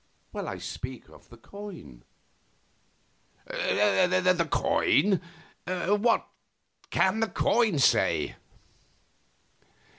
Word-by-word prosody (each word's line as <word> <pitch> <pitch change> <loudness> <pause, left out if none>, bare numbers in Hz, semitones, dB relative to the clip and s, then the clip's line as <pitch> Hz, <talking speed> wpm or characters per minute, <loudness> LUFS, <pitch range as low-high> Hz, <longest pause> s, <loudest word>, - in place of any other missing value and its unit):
I - - -5
speak 125 -1 -7
of - - -18
the 120 - -14
coin." 115 - -11 1.4
"The 180 - +2
coin? 190 +7 +2 0.8
What 235 +1 +2 0.6
can 190 +3 +2
the 225 - +1
coin 220 -5 +1
say?" 135 - +2
185 Hz, 70 wpm, -27 LUFS, 130-205 Hz, 1.4 s, The